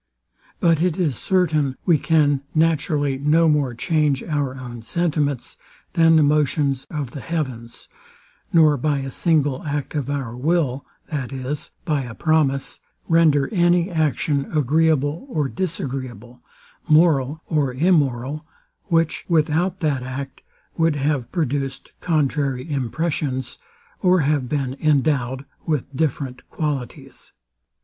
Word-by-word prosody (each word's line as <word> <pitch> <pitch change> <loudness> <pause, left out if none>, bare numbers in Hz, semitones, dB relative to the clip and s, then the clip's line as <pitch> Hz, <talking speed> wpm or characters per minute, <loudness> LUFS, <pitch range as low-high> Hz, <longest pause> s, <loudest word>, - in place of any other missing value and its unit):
But 165 -2 +3
it 175 -1 +1
is 160 -8 0
certain 155 - +1
we 165 -4 +4
can 145 -4 +2
naturally 150 -3 +1
no 155 +4 +3
more 145 -5 +1
change 150 0 +1
our 145 -5 -2
own 120 -3 -8
sentiments, 145 0 -1 0.4
than 165 -1 +5
the 155 - +5
motions 145 -2 +1
of 145 -6 -4
the 140 - -7
heavens; 130 -8 -5 0.6
nor 155 -3 +5
by 145 +2 0
a 135 0 -5
single 145 -4 +1
act 145 -2 -3
of 145 -3 -2
our 135 -5 -3
will, 140 -1 0 0.3
that 140 -5 -3
is, 135 +2 -4 0.2
by 150 -4 +1
a 120 -3 -7
promise, 150 -4 +1 0.3
render 155 -4 +4
any 175 0 +3
action 150 -3 0
agreeable 155 - +1
or 150 - 0
disagreeable, 130 - -5 0.5
moral 155 -2 +3
or 150 -5 0
immoral; 140 -2 +1 0.4
which, 165 -3 +1
without 170 +3 +1
that 145 -5 0
act, 130 +1 -6 0.4
would 165 -2 +2
have 140 -3 -1
produced 140 -5 -2
contrary 140 -5 0
impressions, 140 -1 -2 0.4
or 185 -2 +4
have 140 -3 0
been 135 -3 -1
endowed 140 -3 +1 0.2
with 140 -3 -2
different 135 -3 -2
qualities. 145 -6 -5
145 Hz, 125 wpm, -22 LUFS, 135-160 Hz, 0.6 s, than